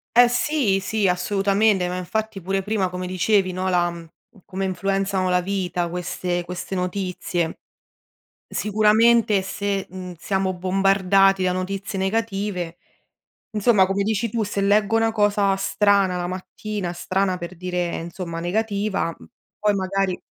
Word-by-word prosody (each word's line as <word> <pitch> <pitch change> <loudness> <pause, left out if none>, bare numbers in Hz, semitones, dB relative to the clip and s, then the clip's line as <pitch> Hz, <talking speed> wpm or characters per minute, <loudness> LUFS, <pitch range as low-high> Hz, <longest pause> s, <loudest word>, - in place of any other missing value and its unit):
Eh, 245 0 +8
sì, 245 -5 +1
sì, 205 +1 0
assolutamente. 195 +1 +2
Ma 180 - -3
infatti 210 +2 -3
pure 195 +2 -1
prima, 205 -3 0
come 180 0 -5
dicevi, 185 +1 +2
no, 185 +1 -2
la 175 -1 +2
mhmm, 170 -1 -10 0.4
come 195 0 -3
influenzano 195 0 0
la 180 0 +3
vita 180 -2 -2
queste 175 0 -3
queste 180 +2 -6
notizie. 180 -2 -2 0.9
Sicuramente 215 0 +3
se, 200 0 -2
mhmm, 185 -1 -7
siamo 190 0 -1
bombardati 195 +1 +3
da 180 - +2
notizie 195 +2 -3
negative, 195 -4 -2 0.8
insomma 210 -2 +4
come 195 +1 -1
dici 220 +2 0
tu, 225 0 -1
se 200 0 -3
leggo 210 +2 +3
una 225 0 +3
cosa 205 -2 +2
strana 195 -1 +2
la 175 0 -2
mattina 185 +1 -5
strana 185 +1 -1
per 175 +1 -7
dire, 180 0 -2
insomma, 170 0 -6
negativa, 200 -1 -1
mhmm, - - -15 0.3
poi 210 -1 +2
magari 190 -1 -1
195 Hz, 140 wpm, -23 LUFS, 180-205 Hz, 0.9 s, Eh